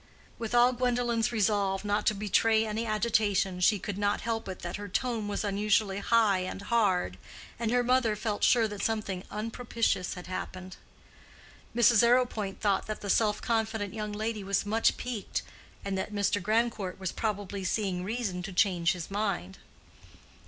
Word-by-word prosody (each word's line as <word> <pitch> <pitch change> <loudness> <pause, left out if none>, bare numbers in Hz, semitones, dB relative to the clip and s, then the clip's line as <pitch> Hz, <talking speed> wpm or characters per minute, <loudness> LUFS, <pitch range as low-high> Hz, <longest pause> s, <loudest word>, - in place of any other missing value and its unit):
With 230 +1 -3
all 245 +1 +6
Gwendolen's 240 -2 0
resolve 200 -3 +1
not 205 +1 0
to 215 - +3
betray 220 +2 +2
any 220 +2 -2
agitation, 210 -4 +1
she 205 +4 +4
could 200 +1 -5
not 205 0 +1
help 225 -1 -2
it 185 - -7
that 175 0 -4
her 205 0 -6
tone 220 +1 -1
was 205 +1 -2
unusually 205 0 +1
high 215 -3 +3
and 185 +1 -4
hard, 195 - +1 0.4
and 230 -2 -1
her 245 +1 +2
mother 245 -3 +2
felt 210 -1 -3
sure 230 -3 +5
that 205 -1 -6
something 200 -5 -2
unpropitious 225 -3 -1
had 180 - -8
happened. 185 0 -6 1.0
Mrs. 235 -2 +6
Arrowpoint 235 -5 +1
thought 200 -3 +1
that 215 - -5
the 200 - -1
self 210 -2 +2
confident 220 -3 -1
young 210 -1 -4
lady 215 0 -3
was 195 0 0
much 220 +2 +2
piqued, 240 -5 -4 0.4
and 200 -1 -2
that 190 - -4
Mr. 205 -1 0
Grandcourt 215 -2 0
was 190 -2 -3
probably 205 -3 -3
seeing 185 -2 -1
reason 205 -3 -3
to 195 +2 -6
change 180 -2 +2
his 180 0 -7
mind. 195 - -2
210 Hz, 165 wpm, -29 LUFS, 195-225 Hz, 1.0 s, all